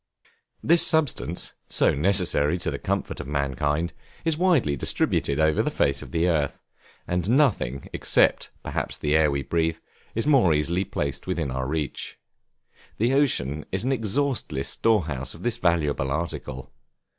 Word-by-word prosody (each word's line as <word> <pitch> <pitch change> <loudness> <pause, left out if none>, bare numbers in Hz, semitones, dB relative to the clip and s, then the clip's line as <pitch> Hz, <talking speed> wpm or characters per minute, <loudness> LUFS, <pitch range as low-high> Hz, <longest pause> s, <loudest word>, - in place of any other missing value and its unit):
This 170 +1 +5
substance, 145 - +1 0.2
so - - +4
necessary 85 -2 +2
to 85 -2 -2
the 70 - -5
comfort - - -3
of - - -6
mankind, 75 +3 -1 0.3
is 165 -2 +2
widely 155 - +2
distributed 70 +1 0
over 80 0 +3
the - - 0
face 70 - +1
of - - -9
the 85 +1 +1
earth, 75 -5 -1 0.4
and 90 +2 -1
nothing, 115 - +1
except, - - +2
perhaps, - - -3
the 75 0 0
air 80 -1 +4
we 70 -1 -2
breathe, 80 0 0 0.4
is 115 - -1
more 125 - +4
easily 85 +6 0
placed 70 -2 -4
within 85 -7 -2
our 65 0 -3
reach. 75 -1 -4 0.8
The 120 +4 +1
ocean 75 - +1
is 95 0 -1
an 130 - 0
exhaustless 115 - -1
store 110 -6 +2
house 70 -3 -5
of - - -12
this 120 -1 0
valuable 80 - 0
article. 70 -4 -4
80 Hz, 155 wpm, -25 LUFS, 70-110 Hz, 0.8 s, This